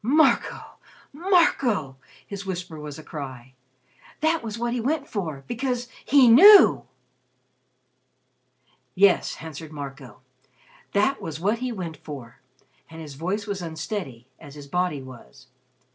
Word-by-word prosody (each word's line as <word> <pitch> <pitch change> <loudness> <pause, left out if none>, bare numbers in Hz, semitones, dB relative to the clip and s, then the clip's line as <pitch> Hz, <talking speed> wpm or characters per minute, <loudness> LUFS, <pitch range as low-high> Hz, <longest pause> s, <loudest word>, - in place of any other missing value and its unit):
"Marco! 300 +8 +1 0.3
Marco!" 295 - +2 0.3
his 200 -1 -7
whisper 180 -4 -6
was 150 -1 -8
a 155 - -10
cry. 130 -5 -8 0.7
"That 320 +1 +2
was 225 -1 -6
what 235 +1 -2
he 245 - -2
went 285 +3 -1
for 160 -10 -5
because 245 0 -3
he 275 -3 +5
knew!" 380 - +8 2.1
"Yes," 195 -1 +3
answered 160 -1 -9
Marco, 135 -5 -9 0.7
"that 240 +7 +1
was 160 -1 -6
what 205 +6 0
he 255 0 -3
went 175 -8 -6
for." 135 -6 -10 0.5
And 165 0 -11
his 155 -3 -9
voice 185 +8 -3
was 200 -3 -4
unsteady, 160 - -6
as 145 -3 -13
his 145 -1 -10
body 175 -2 -2
was. 130 +1 -14
180 Hz, 130 wpm, -24 LUFS, 145-240 Hz, 2.1 s, knew